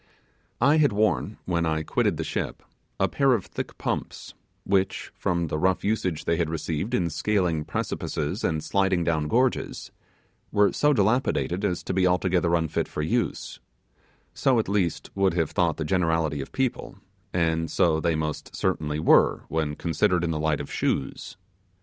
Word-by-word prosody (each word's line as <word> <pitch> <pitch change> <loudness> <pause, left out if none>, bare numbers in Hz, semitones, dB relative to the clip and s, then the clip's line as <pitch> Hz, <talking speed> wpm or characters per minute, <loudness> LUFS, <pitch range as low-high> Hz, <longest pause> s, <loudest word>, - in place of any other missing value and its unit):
I 140 +6 +4
had 145 -7 +3
worn, 105 -5 0
when 85 -2 0
I 80 -1 0
quitted - - 0
the - - -2
ship, - - -4 0.4
a - - +3
pair 135 -2 +3
of 110 -6 -1
thick - - -6
pumps, - - -4 0.3
which, 95 0 0
from 85 -1 -1
the 75 -1 -3
rough 95 +2 +1
usage 95 -7 -1
they 85 - +1
had 85 -2 0
received 80 +4 -2
in 85 -3 0
scaling 85 -4 0
precipices 75 +9 -3
and 80 -2 0
sliding 95 -3 +1
down 80 -3 0
gorges, 125 +8 0 0.6
were 105 -1 +4
so 150 - +3
dilapidated 110 -5 +1
as 90 -4 -1
to - - -3
be 90 0 +3
altogether 90 -1 +2
unfit 80 -2 -1
for 75 - -4
use 115 +9 -2 0.7
so, 130 -3 +2
at 110 - +1
least, 95 -4 -1
would 95 -3 +1
have 80 -3 0
thought - - +1
the 80 - -3
generality 80 -4 +1
of 65 - -8
people, 130 -2 -2 0.4
and 80 -2 0
so 80 -2 +2
they 85 0 +1
most 75 -1 -4
certainly 75 -1 -1
were, 80 - +4
when 80 -2 -1
considered 85 +2 +1
in 85 - 0
the 80 - -2
light 80 -1 +1
of 70 - -6
shoes. 65 +6 -2
85 Hz, 170 wpm, -26 LUFS, 80-100 Hz, 0.7 s, I